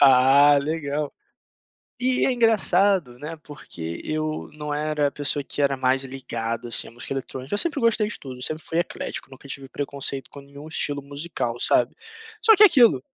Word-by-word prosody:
Ah, 140 +2 +7
legal. 150 0 -2 0.9
E 255 0 +2
é - - +2
engraçado, 200 - +3
né, 155 +4 -6
porque 85 - -8
eu 155 0 -3
não 150 -1 -5
era 150 0 0
a - - -6
pessoa 145 0 -1
que 145 - -3
era 140 -1 +2
mais 130 +1 +1
ligada, 120 -3 -4
assim, - - -3
à - - -12
música 120 +3 -6
eletrônica, 135 +3 -5
eu - - +1
sempre 290 +2 0
gostei 230 -2 +3
de 220 - -5
tudo, 130 -2 -8
sempre 155 +3 -3
fui 165 - -2
eclético, 170 - -4
nunca 135 +1 -13
tive 135 0 -7
preconceito 140 -1 -5
com 140 - -10
nenhum 140 +2 -12
estilo 145 -2 -1
musical, 140 -4 -4
sabe, 120 0 +2 0.5
só 445 0 +7
que 420 - +5
é - - +12
aquilo 260 - +5
145 Hz, 180 wpm, -24 LUFS, 135-160 Hz, 0.9 s, é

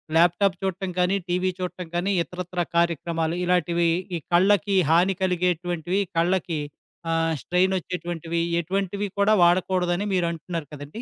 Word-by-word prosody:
Laptop 175 +4 +4
చూడటం 190 0 -2
కానీ, 180 +2 +2
TV 180 +1 0
చూడటం 180 -1 -5
కాని 180 +3 0
ఇతరత్రా 180 0 -4
కార్యక్రమాలు, 170 -1 0
ఇలాటివి 175 -1 +2 0.3
ఈ - - -2
కళ్ళకి 200 +2 +3
హాని 175 +4 +4
కలిగేటువంటివి 180 0 0 0.2
కళ్ళకి 170 -2 +1 0.5
ఆహ్, 165 0 +1
స్ట్రెయిన్ 185 +2 +1
వచ్చేటువంటివి 170 -2 -4 0.2
ఎటువంటివి 195 +3 -2
కూడా 200 +2 +4
వాడకూడదని 180 +1 +2
మీరంటున్నారు 170 -2 -2
కదండీ! 145 +9 -8
175 Hz, 120 wpm, -24 LUFS, 170-185 Hz, 0.5 s, Laptop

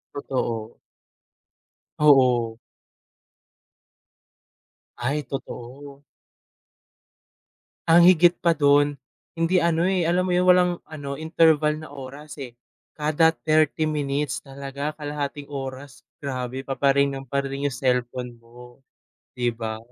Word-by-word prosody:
Totoo. 115 -5 -3 1.2
Oo. 125 -6 +4 2.4
Ay, 140 +5 -1
totoo. 135 +2 -8 1.8
Ang 165 +1 +7
higit 175 0 +5
pa 170 -3 +2
dun, 145 0 +3 0.4
hindi 175 +2 +2
ano, 170 0 +2
eh, 180 -3 +1
alam 180 +1 +2
mo 180 - 0
yung 180 +1 +3
walang 180 0 +5 0.2
ano 145 -3 -6
interval 160 -2 +3
na 155 -2 -10
oras, 140 +2 -9
eh, 120 -2 -9 0.4
kada 155 +2 +3
30 155 -1 +1
minutes 145 -4 -2
talaga 140 +1 -6
kalahating 145 -1 -4
oras 135 -3 -7 0.2
grabe 130 -1 -5
pa-pa-ring 140 0 +2
ng 135 -1 -7
pa-ring 140 0 -1
yung 125 - -7
cellphone 125 -1 -1
mo, 120 +2 -16 0.6
'di 120 -1 0
ba? 110 -1 -5
140 Hz, 105 wpm, -24 LUFS, 130-155 Hz, 2.4 s, Ang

